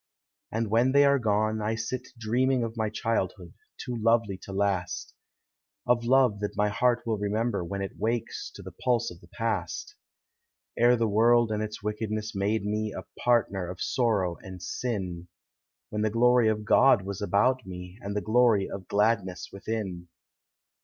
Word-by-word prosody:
And 110 -1 -2
when 120 +4 +3
they 140 0 +6
are 140 0 +4
gone, 110 -1 +1
I 110 +1 0
sit 125 +3 -4
dreaming 125 +3 +1
Of 115 -1 -3
mv 110 -2 -2
childhood, 95 -6 -2 0.2
too 125 - -5
lovelv 115 -4 +1
to - - -9
last; 95 -2 -1 0.7
1 120 -1 +3
f 120 - -9
love 125 -5 +4
that 105 0 -4
my 105 0 +2
heart 120 +3 +1
will 110 -3 -1
remember 105 -1 -1
When 100 +3 -4
it 95 - -7
wakes 115 +1 -2
to - - -10
the - - -8
pulse 120 -6 0
of 90 - -13
the 85 - -17
past, 110 - -3 0.8
10 120 - +4
re 125 - +6
the 115 -1 +1
world 115 +2 +4
and 105 0 -1
its 105 -1 -5
wickedness 110 0 -3
made 100 +1 0
me 105 +1 -1
A - - -6 0.2
partner 100 -7 +2
of 90 0 -7
sorrow 105 -9 0
and 95 -1 -9
sin, 90 -3 -4 0.3
— - - -65
When 105 - -2
the 110 - +2
glory 120 +1 +4
of 105 -1 0
Clod 125 -2 +5
was 100 0 -5
about 125 +6 +2
me, 90 +2 -9
And 100 +1 -5
the 105 - 0
glory 110 -3 +3
of 95 -2 -7
gladness 100 -4 0
within. 100 -4 -4
110 Hz, 180 wpm, -27 LUFS, 100-115 Hz, 0.8 s, they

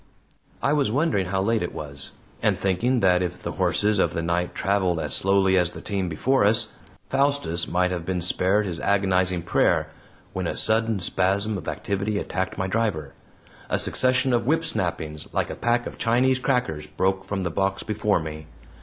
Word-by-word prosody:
I 140 - +3
was 145 -6 +2
wondering 135 - +1
how 95 +1 0
late 115 +2 +1
it 90 - -4
was, 70 -2 -7 0.3
and - - +2
thinking 115 +7 +1
that 90 -1 +4
if 90 0 -4
the - - -3
horses 105 -1 +1
of - - +1
the 85 - -1
night 85 +1 -1
traveled 95 -4 +1
as - - -3
slowly 95 -1 +3
as 90 -1 +2
the - - -10
team 95 -3 -2
before 130 - +1
us, 110 +2 +3 0.4
Faustus 140 - 0
might 90 +1 +1
have 90 -2 -3
been 90 +1 -2
spared 95 +4 +1
his 85 -4 -4
agonizing 95 -3 +1
prayer, 85 - +2 0.4
when - - -2
a - - -3
sudden 110 -1 +1
spasm 100 +4 0
of 95 - -6
activity 100 +1 -2
attacked 95 -2 -3
my 95 - -1
driver. 95 -8 -1 0.6
A - - +1
succession 130 0 +1
of 120 0 +1
whip 160 +3 +2
snappings, 80 -3 -2
like - - 0
a - - -5
pack 120 0 0
of - - -8
Chinese 125 +3 +2
crackers, 125 - -1
broke 95 +5 0
from 100 -1 -3
the 85 - -2
box 95 +3 -1
before 105 -2 +1
me. 80 -1 -7
95 Hz, 185 wpm, -24 LUFS, 90-110 Hz, 0.6 s, that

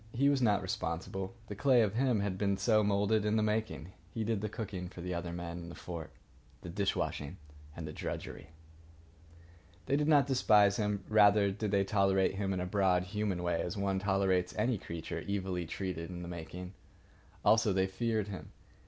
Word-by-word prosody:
He 140 +4 +4
was 140 -2 +2
not 105 -4 +3
responsible. 95 +3 -3
The 105 - -6
clay 125 +2 +4
of 105 -2 0
him 120 -3 +2
had 100 -2 -1
been 100 0 0
so 110 +2 +3
moulded 105 +1 +2
in 105 +1 +1
the 110 - +2
making. 105 -7 -2 0.2
He 115 - -2
did 110 -2 -1
the 105 - -2
cooking 95 -4 -5
for 90 - -12
the 90 +1 -3
other 85 0 -3
men 85 0 -5
in 85 0 -8
the 85 - -9
fort, 85 -3 -7 0.5
the 90 - -8
dish 100 +2 0
washing 75 +5 -3 0.4
and 80 -2 -6
the 75 - -6
drudgery. 75 +1 -6 1.4
They 140 - +1
did 150 +1 +1
not 145 -3 +5
despise 105 -7 +4
him. 105 -2 -1
Rather 105 -2 +5
did 105 +2 -3
they 100 -1 +3
tolerate 95 -1 +2
him 95 0 -2
in 95 - -1
a 90 - -2
broad 90 -1 +2
human 100 -2 -2
way, 85 -1 0
as 90 - -4
one 100 -1 0
tolerates 95 -2 +1
any 110 0 +1
creature 85 -2 -5
evilly 95 -3 -2
treated 90 -2 -4
in 90 -1 -6
the - - -6
making. 90 +2 -7 0.7
Also, 110 -1 +5
they 95 0 +2
feared 110 +2 -1
him. 100 -3 -8
100 Hz, 195 wpm, -32 LUFS, 90-105 Hz, 1.4 s, not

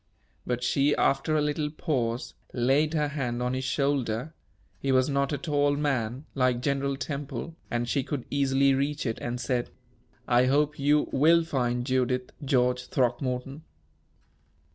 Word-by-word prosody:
But 125 0 -1
she, 140 +3 +2
after 155 +3 +1
a 150 - +2
little 150 0 -1
pause, 130 -7 -2 0.2
laid 140 +6 +2
her 150 -1 +1
hand 125 -4 -2
on 125 +1 -1
his 130 0 -2
shoulder 135 0 -1 0.5
he 135 - 0
was 130 +1 +3
not 140 0 +1
a 145 - 0
tall 145 -3 +1
man, 135 -2 -1
like 125 -2 +2
General 140 +1 -1
Temple, 145 +2 -5
and 120 0 -1
she 140 - +1
could 140 -1 -4
easily 140 -1 +3
reach 140 +2 -1
it 115 -2 -2
and 120 +1 -3
said: 120 0 -1 0.6
"I 125 +1 +4
hope 145 +2 +2
you 145 +2 +3
will 165 +5 +5
find 125 -5 -1
Judith, 125 -1 0
George 125 -2 +1
Throckmorton." 125 +2 -1
135 Hz, 150 wpm, -27 LUFS, 125-145 Hz, 0.6 s, will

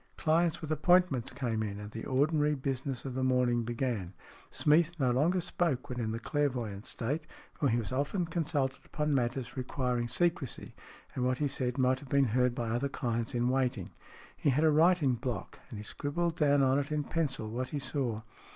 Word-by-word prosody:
Clients 165 0 +2
with 155 -1 -5
appointments 155 -5 +3
came 115 -5 -2
in, 105 -1 -3
and 105 0 -8
the 115 - -6
ordinary 150 +2 +2
business 135 -1 -3
of 135 - -4
the 130 +1 -1
morning 125 -2 +2
began. 115 -6 -2 0.3
Smeath 160 +3 +3
no 130 -5 +2
longer 160 +9 +2
spoke 165 -7 -1
when 125 -1 -4
in 110 -2 -1
the 110 - -2
clairvoyant 120 -6 -2
state, 145 +7 -3 0.3
for 140 - 0
he 115 - +2
was 115 -1 -3
often 145 +8 0
consulted 155 -5 -1
upon 150 -1 -1
matters 125 0 -1
requiring 125 -2 -1
secrecy, 170 -1 -1 0.4
and 125 - -2
what 130 0 +1
he 150 - +1
said 130 -2 -2
might 130 0 +3
have 140 -2 -13
been 140 0 +4
heard 125 -1 +2
by 120 -2 -2
other 125 +4 0
clients 120 -2 -2
in 120 +1 +2
waiting. 125 -6 0 0.4
He - - +1
had 140 +4 +2
a 160 - +5
writing 160 -3 +4
block, 125 -1 -4
and 105 -2 -7
scribbled 165 +8 -2
down 145 -3 +3
on 135 +1 +3
it 145 +1 -4
in 150 -1 0
pencil 135 -8 -2
what 125 +3 -3
he 150 - -3
saw. 130 -5 -2
130 Hz, 190 wpm, -31 LUFS, 120-150 Hz, 0.4 s, a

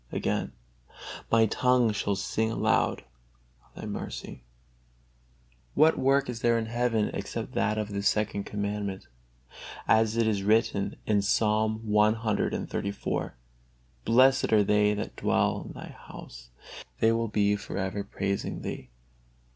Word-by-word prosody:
Again: - - -2 0.8
"My 115 -1 +5
tongue 125 +1 +2
shall 100 0 -1
sing 110 +3 -1
aloud - - +1 0.6
of - - -30
Thy - - -7
mercy." - - -6 1.3
What 155 +2 +4
work 135 +1 +3
is 120 -2 -5
there 120 -1 +3
in 115 - -1
heaven 115 -1 0
except - - -5
that 110 -1 0
of 105 -1 -2
this 100 0 0
Second 105 -1 -1
Commandment? 100 -1 -4 0.8
As 110 0 +3
it 115 - +3
is 105 -3 +1
written 105 -1 +1
in 105 -2 +2
Psalm 110 +2 +1
lxxxiv: 105 -1 0 0.7
"Blessed 130 - +4
are 105 -2 +5
they 105 +1 +3
that 105 - -5
dwell - - 0
in - - -9
Thy - - -9
house: - - -12 0.5
they 110 - +4
will 115 0 0
be 105 -1 +2
for 100 - -6
ever 100 +1 -2
praising 100 0 -3
Thee." 65 - -6
110 Hz, 130 wpm, -28 LUFS, 100-115 Hz, 1.3 s, My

